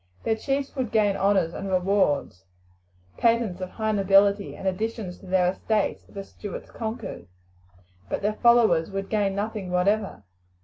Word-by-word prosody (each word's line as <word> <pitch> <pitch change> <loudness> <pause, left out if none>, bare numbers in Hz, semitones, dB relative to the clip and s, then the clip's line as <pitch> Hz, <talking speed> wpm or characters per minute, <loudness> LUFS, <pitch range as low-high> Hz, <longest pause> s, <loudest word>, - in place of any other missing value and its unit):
Their 225 - +1
chiefs 275 +5 -2
would 255 -4 -2
gain 210 -3 +3
honours 195 -4 +2
and 195 - -5
rewards, 180 - +1 0.7
patents 230 -6 +1
of 185 - -4
high 220 +1 -2
nobility, 200 0 +3
and 195 - -5
additions 200 -1 -3
to 195 - -14
their 180 -1 +3
estates 210 +2 -1
if - - -20
the 195 - -5
Stuarts 205 0 -9
conquered, 220 - -6 0.8
but - - -3
their 210 +1 +1
followers 220 -9 +4
would 195 0 -4
gain 205 -3 0
nothing 205 -2 -3
whatever. 190 - 0
200 Hz, 150 wpm, -25 LUFS, 185-220 Hz, 0.8 s, followers